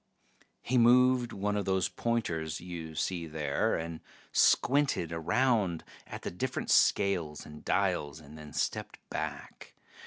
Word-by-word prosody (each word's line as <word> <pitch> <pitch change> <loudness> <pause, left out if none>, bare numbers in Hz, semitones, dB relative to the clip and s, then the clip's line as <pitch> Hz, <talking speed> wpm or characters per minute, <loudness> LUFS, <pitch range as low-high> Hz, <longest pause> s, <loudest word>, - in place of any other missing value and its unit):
He 125 0 +2
moved 125 0 +5
one 105 +1 -2
of 105 - -1
those 95 -1 +1
pointers 85 -10 -2
you 85 -3 -7
see 85 +1 -2
there, 75 -2 0
and 80 0 -4 0.3
squinted 135 - +3
around 90 +1 +1 0.2
at - - -8
the - - -3
different 130 +8 -3
scales 85 -7 +2
and 75 0 -11
dials, 75 +2 0
and 75 -1 -13
then 75 -1 -10
stepped - - -2
back. - - -6
90 Hz, 130 wpm, -30 LUFS, 80-115 Hz, 0.3 s, moved